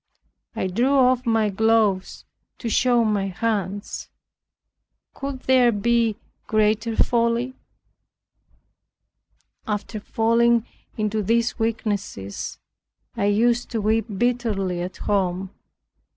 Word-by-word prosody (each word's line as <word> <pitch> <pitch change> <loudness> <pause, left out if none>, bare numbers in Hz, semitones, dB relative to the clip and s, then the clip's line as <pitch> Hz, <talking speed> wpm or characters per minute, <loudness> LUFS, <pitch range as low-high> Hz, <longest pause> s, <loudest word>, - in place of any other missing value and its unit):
I - - -1
drew 240 +9 +1
off 255 -1 +3
my 225 -2 +2
gloves 215 -2 +1 0.3
to 235 - -4
show 240 +1 +3
my 205 -2 0
hands. 200 +1 -3 1.0
Could 275 -2 -5
there 255 -2 +4
be 230 +1 +1 0.3
greater 215 +1 +1
folly? 235 +2 +1 2.1
After 210 +1 -3
falling 230 +2 +2 0.3
into 215 0 0
these 230 +4 0
weaknesses, 205 - -3 0.6
I 200 - 0
used 235 +4 +2
to 230 - -2
weep 220 +1 +1
bitterly 210 -7 0
at 180 +1 -5
home. 190 -2 -1
225 Hz, 95 wpm, -23 LUFS, 205-235 Hz, 2.1 s, there